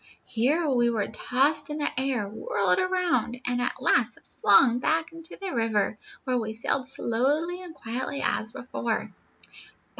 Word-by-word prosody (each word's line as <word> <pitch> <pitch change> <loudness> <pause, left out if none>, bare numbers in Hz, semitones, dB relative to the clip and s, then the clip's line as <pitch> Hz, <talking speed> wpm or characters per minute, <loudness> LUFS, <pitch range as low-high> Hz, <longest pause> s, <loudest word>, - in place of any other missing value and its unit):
Here 280 +8 +1
we 240 -4 +3
were 220 -4 -1
tossed 280 +7 +1
in 300 - -3
the 295 - 0
air, 255 -5 0
whirled 200 -3 0
around, 360 -9 0
and 245 0 0
at 245 - -2
last 240 -2 +2 0.2
flung 235 +4 +6
back 320 +4 +1
into 330 0 -11
the 390 -2 -4
river, 220 -3 0 0.2
where 255 -2 0
we 220 -1 -4
sailed 255 +3 -1
slowly 290 +9 0
and 345 -3 -10
quietly 250 +3 -4
as 220 - 0
before. 240 -3 -3
250 Hz, 150 wpm, -27 LUFS, 225-300 Hz, 0.2 s, flung